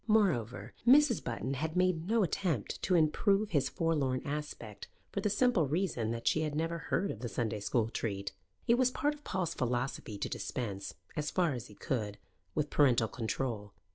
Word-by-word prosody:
Moreover, 125 - +2
Mrs. 275 -2 +6
Button 130 - -2
had 155 +5 -2
made 180 -2 +2
no 225 0 +3
attempt 165 - -1
to 185 - +2
improve 195 +6 +3
his 140 -4 +2
forlorn 145 -6 0
aspect, 145 -8 -5 0.2
for 200 - -2
the 210 - +1
simple 205 - +3
reason 145 - 0
that 115 0 -3
she 155 - +3
had 150 -2 -1
never 165 +2 -1
heard 195 +6 0
of 110 - -7
the 120 0 -4
Sunday 110 +1 -1
school 110 +2 +1
treat. 100 -4 -3 0.4
It 235 +2 +4
was 255 -1 +5
part 290 +3 0
of 295 0 -15
Paul's 185 - -1
philosophy 120 -3 -2
to - - -2
dispense, 100 -6 -4 0.2
as 150 -1 -1
far 175 -5 +2
as 125 -1 -5
he 105 - -14
could, 105 -5 -2 0.4
with 150 -1 0
parental 125 -6 +4
control. 110 -3 -3
145 Hz, 180 wpm, -32 LUFS, 115-185 Hz, 0.4 s, Mrs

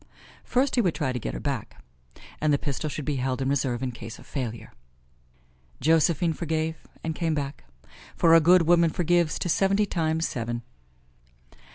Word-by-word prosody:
First 255 +2 +1
he 245 - +3
would 180 -7 0
try 130 -4 -1
to 125 - -2
get - - -4
her - - -4
back, - - -5 0.6
and 155 0 +2
the 145 - +4
pistol 145 +2 -3
should 150 -1 -5
be 145 -2 -1
held 130 0 -1
in 135 - -1
reserve 130 -3 0
in 130 - -2
case 115 -1 -9
of - - -15
failure. 115 -5 -5 1.1
Josephine 165 +2 +3
forgave 160 0 -2 0.3
and 160 - -2
came 165 -1 -1
back; 140 - -4 0.5
for 165 -1 +4
a 165 - +9
good 175 +2 +6
woman 170 0 +4
forgives 175 -1 +1
to - - -3
seventy 195 +4 +2
times 160 -3 0
seven. 120 0 -4
155 Hz, 175 wpm, -26 LUFS, 130-170 Hz, 1.1 s, a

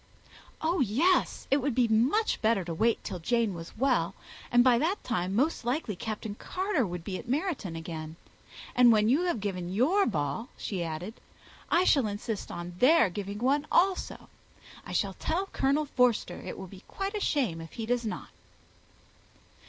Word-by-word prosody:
"Oh 335 +3 +1
yes 275 - +2
it 275 - +5
would 280 -3 -1
be 245 -2 +3
much 255 - +2
better 220 -3 +2
to 170 - -4
wait 225 +7 +1
till 180 - -5
Jane 230 +3 +1
was 165 +2 -9
well; 230 -8 +1 0.4
and 240 0 +6
by 245 -2 +5
that 340 +8 0
time, 190 -5 -1
most 280 +6 +1
likely, 240 - -1
Captain 215 +1 -5
Carter 360 - -1
would 175 -1 -6
be 185 0 -4
at - - -11
Meryton 275 - -2
again. 160 -1 -6 0.6
And 245 -1 +7
when 215 0 +4
you 300 +8 +3
have 345 -10 0
given 185 -3 -3
your 305 - +3
ball," 150 - -2
she 185 -4 -3
added, 170 +7 -6 0.5
"I 345 - +4
shall 275 -10 +4
insist 205 +1 -4
on 175 +1 -6
their 255 - +5
giving 200 +2 -5
one 280 +6 +1
also. 375 +1 +1 0.6
I - - -7
shall 195 -2 0
tell 345 - -1
Colonel 295 -4 0
Forster 245 -9 +1
it - - -6
will 190 - -7
be 185 0 -12
quite 390 +1 -4
a 420 - -2
shame 240 - 0
if 165 - -10
he 225 - -4
does 245 +1 0
not." 220 - -5
230 Hz, 175 wpm, -29 LUFS, 190-285 Hz, 0.6 s, And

